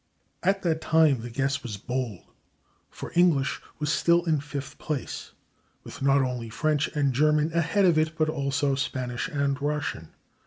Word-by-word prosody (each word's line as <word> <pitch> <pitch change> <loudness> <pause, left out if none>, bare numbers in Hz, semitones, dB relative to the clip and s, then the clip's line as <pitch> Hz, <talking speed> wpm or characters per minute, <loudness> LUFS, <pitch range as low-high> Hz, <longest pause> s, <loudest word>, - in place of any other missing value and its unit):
At 195 +1 +1
that 160 -2 0
time 155 -6 +3
the 120 - -6
guess 135 +3 -1
was 115 -6 -6
bold, 120 -3 -4 0.7
for - - -8
English 160 -5 +3 0.2
was 150 0 -1
still 170 0 +3
in 160 -3 +2
fifth 140 -1 -7
place, 145 -7 -5 0.5
with - - -10
not 135 0 +4
only 125 -3 -3
French 150 +5 0
and 140 -3 +2
German 150 +3 +2
ahead 170 +4 +2
of 170 -4 +4
it, 155 0 -1
but 155 - +2
also 140 -2 0
Spanish 130 -2 -2
and 140 -1 -1
Russian. 145 - -2
145 Hz, 160 wpm, -26 LUFS, 130-155 Hz, 0.7 s, not